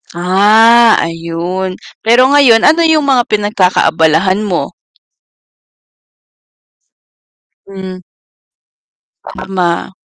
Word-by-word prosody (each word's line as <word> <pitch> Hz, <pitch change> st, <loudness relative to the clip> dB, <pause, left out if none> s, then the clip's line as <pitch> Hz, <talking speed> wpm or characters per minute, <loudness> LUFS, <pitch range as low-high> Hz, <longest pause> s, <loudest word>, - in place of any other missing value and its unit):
Ah, 215 Hz, +6 st, +3 dB
ayun, 170 Hz, +3 st, -5 dB, 0.3 s
pero 235 Hz, +3 st, +3 dB
ngayon 245 Hz, -6 st, +3 dB
ano 320 Hz, +3 st, +3 dB
yung 320 Hz, -3 st, +1 dB
mga 260 Hz, -3 st, 0 dB
pinagkakaabalahan 190 Hz, -3 st, 0 dB
mo? 195 Hz, -5 st, -4 dB, 3.0 s
Hmm. 190 Hz, -1 st, -9 dB, 1.2 s
Tama. 180 Hz, -3 st, -5 dB
195 Hz, 65 wpm, -11 LUFS, 180-230 Hz, 3.0 s, Ah